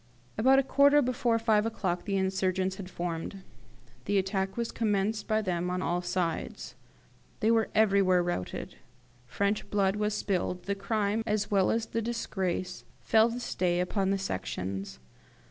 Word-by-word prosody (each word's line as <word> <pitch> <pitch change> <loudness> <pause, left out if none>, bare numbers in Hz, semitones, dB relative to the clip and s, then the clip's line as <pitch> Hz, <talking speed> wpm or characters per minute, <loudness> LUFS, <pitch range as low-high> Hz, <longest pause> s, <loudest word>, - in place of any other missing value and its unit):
"At 260 +5 +5
a 275 - +4
quarter 285 +2 +5
before 240 -2 +1
five 220 -2 +2
o'clock 190 -6 -2
the 200 -1 0
insurgents 190 0 0
had 185 -2 -7
formed. 175 +2 -5 0.6
The 200 0 +1
attack 190 +1 -1
was 235 -1 -2
commenced 210 -1 0
by 220 0 +1
them 180 -2 -1
on 180 +1 -2
all 175 +1 0
sides. 175 -2 -3 0.7
They 225 -1 +3
were 225 -1 +2
everywhere 195 -4 +4
routed. 175 - -4 0.5
French 200 +9 -1
blood 195 -1 +2
was 210 0 0
spilled: 180 -3 -1
the 200 - -1
crime, 205 +1 -1
as 210 -1 0
well 195 -2 +3
as 225 0 0
the 230 - -2
disgrace, 190 -5 -3 0.2
fell 220 +1 +4
this 240 +1 -4
day 175 -1 +1
upon 190 +2 0
the 195 - +2
Sections. 95 - -4
195 Hz, 155 wpm, -29 LUFS, 180-220 Hz, 0.7 s, At